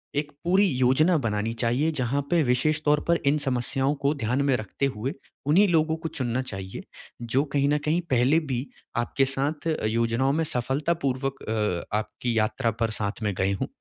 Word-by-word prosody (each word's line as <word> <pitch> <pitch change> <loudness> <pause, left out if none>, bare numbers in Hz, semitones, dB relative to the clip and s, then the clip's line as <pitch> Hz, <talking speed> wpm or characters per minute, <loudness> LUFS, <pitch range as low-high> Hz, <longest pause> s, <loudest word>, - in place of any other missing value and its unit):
एक 145 +1 -1
पूरी 190 +4 +4
योजना 135 +4 +3
बनानी 105 0 -1
चाहिए, 120 +6 +1
जहाँ 140 -1 -1
पे 170 -1 +3
विशेष 150 +4 +2
तौर 150 0 +3
पर 170 0 +4
इन 145 +2 +4
समस्याओं 135 0 0
को 140 +1 +3
ध्यान 125 0 0
में 135 -2 +3
रखते 110 +5 -3
हुए 120 +6 -3 0.3
उन्हीं 175 +9 +5
लोगों 160 -2 +2
को 165 - -2
चुनना 130 -5 -2
चाहिए, 95 -6 -7 0.4
जो 120 +4 +1
कहीं 140 -1 +2
न 150 - +3
कहीं 160 +3 +2
पहले 130 +5 +4
भी 135 -5 -3 0.3
आपके 120 +3 +1
साथ 140 +4 -1 0.2
योजनाओं 115 +4 +1
में 160 +2 +1
सफलतापूर्वक 135 0 -1
अ, 105 -3 -1
आपकी 115 +2 -3
यात्रा 115 +2 +1
पर 115 -1 +1
साथ 100 +2 -3
में 105 -1 0
गए 95 +1 +1
हों। - - 0
135 Hz, 180 wpm, -26 LUFS, 115-150 Hz, 0.4 s, उन्हीं